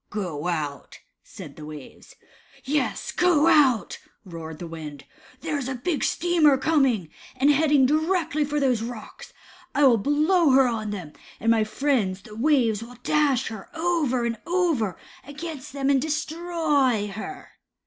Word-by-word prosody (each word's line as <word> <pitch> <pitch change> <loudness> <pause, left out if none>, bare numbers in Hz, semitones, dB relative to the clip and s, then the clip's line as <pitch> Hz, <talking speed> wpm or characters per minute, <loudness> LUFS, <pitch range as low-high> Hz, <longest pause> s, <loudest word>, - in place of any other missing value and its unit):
"Go 175 -7 -4
out," 150 -5 -4 0.2
said - - -11
the 155 - -9
waves. 150 -3 -12 0.5
Yes, 285 +2 -1
go 350 -4 +3
out," 265 -9 +3 0.3
roared 165 -3 -8
the 175 - -7
wind. 155 -4 -8 0.4
"There 310 -2 -2
is 265 -2 -4
a 265 - -3
big 290 +5 -2
steamer 330 -5 +3
coming, 265 - +1 0.3
and 270 +3 +4
heading 290 -2 +4
directly 315 +1 +1
for 295 +1 -1
these 255 -5 +1
rocks. 230 -1 -8 0.4
I 290 - +3
will 245 -5 +6
blow 305 - +3
her 265 -1 +5
on 220 -3 -3
them, 180 -7 -6 0.3
and 230 - +2
my 225 -1 +3
friends, 215 -5 -1
the 210 - -12
waves, 235 -4 +2
will 240 +1 -10
dash 285 -5 +1
her 215 -3 -9
over 315 -8 0
and 230 -2 -3
over 330 - 0 0.3
against 295 0 -8
them, 275 0 -2
and 270 -2 +3
destroy 305 -6 0
her." 220 - -8
265 Hz, 150 wpm, -24 LUFS, 215-305 Hz, 0.5 s, will